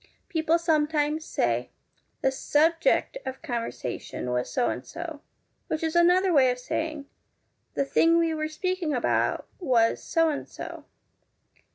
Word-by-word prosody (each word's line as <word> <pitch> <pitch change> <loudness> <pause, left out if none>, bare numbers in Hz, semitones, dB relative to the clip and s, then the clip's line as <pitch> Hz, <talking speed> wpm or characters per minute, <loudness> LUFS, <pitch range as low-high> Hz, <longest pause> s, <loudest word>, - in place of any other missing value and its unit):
People 325 0 +2
sometimes 310 -2 +1
say - - 0 0.3
' - - -43
the 265 - +3
subject 325 - +2
of 260 +3 -6
conversation 230 - -4
was 125 0 -1
so 240 - +1
and - - -3
so,' 330 -3 -7 0.5
which 315 - -2
is 320 +1 -1
another 360 +2 +4
way 265 -4 +6
of 250 - 0
saying 305 +3 -3 0.3
* - - -47
the 275 - +1
thing 330 +4 +4
we 330 -1 +2
were 310 0 -2
speaking 335 -1 -2
about 245 - 0
was 245 -9 +2
so 330 -1 +2
and 290 - -4
so.' - - -8
310 Hz, 150 wpm, -27 LUFS, 265-330 Hz, 0.5 s, way